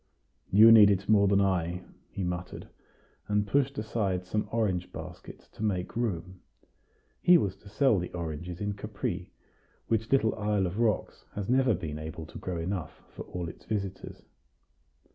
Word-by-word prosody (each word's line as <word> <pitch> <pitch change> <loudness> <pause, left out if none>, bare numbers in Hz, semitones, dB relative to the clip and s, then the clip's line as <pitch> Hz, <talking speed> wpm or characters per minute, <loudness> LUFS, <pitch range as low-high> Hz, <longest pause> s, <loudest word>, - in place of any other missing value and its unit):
"You 110 +4 +8
need 105 -3 +9
it 95 -1 0
more 100 -2 +5
than 100 0 +4
I," 90 -2 0 0.3
he 100 - -5
muttered, 90 0 -4 0.6
and 105 0 +1
pushed 140 +4 +1
aside 100 -4 -1
some 105 +3 -2
orange 100 -6 0
baskets - - -10
to - - -8
make 95 -1 -1
room: 95 -6 -3 0.8
he 175 0 +7
was 100 - -1
to 100 - -15
sell 110 0 +3
the 90 - -5
oranges 85 +1 -5
in 100 0 -1
Capri, 100 -3 -4 0.6
which 110 0 0
little 125 -5 +3
isle 105 -2 0
of 90 +5 -3
rocks 110 -4 0
has 100 -1 -3
never 130 -3 +3
been 80 -4 -5
able 80 +1 -6
to - - -10
grow 90 -2 -4
enough 85 -1 -4
for - - -9
all 90 -1 -5
its 80 - -11
visitors. 100 -3 -4
100 Hz, 160 wpm, -29 LUFS, 90-110 Hz, 0.8 s, need